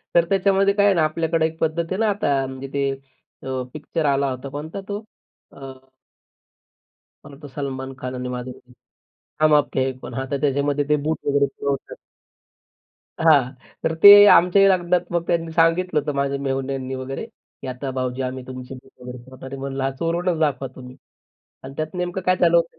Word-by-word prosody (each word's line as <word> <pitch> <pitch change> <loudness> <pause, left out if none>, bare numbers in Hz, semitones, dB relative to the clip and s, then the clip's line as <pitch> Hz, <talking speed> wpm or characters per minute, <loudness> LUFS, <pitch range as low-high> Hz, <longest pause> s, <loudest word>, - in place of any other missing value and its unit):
तर 170 - +5
त्याच्यामध्ये 195 0 +3
काय 200 0 +3
आहे 200 - +5
ना, 160 - +3
आपल्याकडे 160 +1 0
एक 160 0 -4
पद्धत 165 +1 0
आहे 190 - -1
ना, 225 - +2
आता 140 -9 0
म्हणजे 130 +1 -7
ते 140 -1 0 0.5
अ, 130 -1 -3
पिक्चर 155 +1 -3
आला 140 -1 +2
होता. 130 +2 -6
कोणता 155 +7 -6
तो? 205 +1 -5 0.5
अ 135 - -11 1.6
मला 140 - -12
वाटतं 145 +1 -12
सलमान 135 -2 -5
खान 130 0 -5
आणि 125 0 -4
माधुरी 125 0 -6
दीक्षित 125 0 -22 0.7
"हम 155 -1 +5
आपके 145 -2 +1
है 135 - -1
कोन". - - -9
हां. 130 - -3
तर 140 - -1
त्याच्यामध्ये 145 0 +1
ते 150 - +4
बूट 160 +1 -1
वगैरे 140 0 +3
चोरतात. 140 0 -4 1.2
हां. 145 -5 +4 0.3
तर 160 - +1
ते 200 - +11 0.3
आमच्याही 195 +3 +5
लग्नात 180 -1 +2
मग 170 -1 +1
त्यांनी 165 -1 -1
सांगितलं 165 0 +2
होतं 150 0 -3
माझ्या 140 0 -1
मेहुण्यांनी 135 -1 -3
वगैरे, 130 +8 -5
की 215 - -16
"आता 130 +2 -5
भाऊजी 130 0 -3
आम्ही 130 0 -4
तुमची 130 0 -8
बूट 130 +1 -15
वगैरे 125 0 -8
चोरणार 130 0 -11
आहे." 135 - -7
म्हणलं, 135 0 -2
"चोरूनच 170 0 -1
दाखवा 140 -3 0
तुम्ही." 125 0 -11 0.7
आणि 135 +1 -9
त्यात 155 +3 -4
नेमकं 180 +1 -3
काय 185 - +3
झाल 170 -2 +3
होतं. 165 -1 +1
140 Hz, 180 wpm, -22 LUFS, 135-165 Hz, 1.6 s, ते